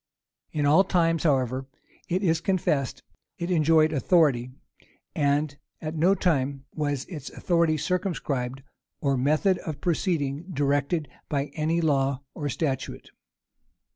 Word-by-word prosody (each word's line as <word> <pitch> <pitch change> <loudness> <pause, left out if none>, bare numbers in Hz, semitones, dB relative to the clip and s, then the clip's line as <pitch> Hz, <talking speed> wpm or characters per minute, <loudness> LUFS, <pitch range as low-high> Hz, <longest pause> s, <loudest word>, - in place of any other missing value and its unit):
In 145 -1 0
all 155 +7 +6
times, 165 -3 +1
however, 130 -3 +1 0.4
it 185 +3 0
is 165 -3 +2
confessed, 155 - 0 0.3
it 170 +2 -3
enjoyed 160 -1 +4
authority; 140 -5 +3 0.7
and 145 0 +1 0.2
at 155 0 -4
no 175 +5 +4
time 140 -6 0
was 145 -3 -2
its 150 -7 -7
authority 170 -3 +1
circumscribed, 140 -7 -2 0.4
or 140 -1 +1
method 155 +8 +2
of 155 -3 -6
proceeding 165 -2 -1
directed 145 +1 0 0.2
by 140 -1 -1
any 160 +2 0
law 140 -3 +1
or 145 -1 -3
statute. 135 -2 -3
150 Hz, 120 wpm, -26 LUFS, 140-170 Hz, 0.7 s, all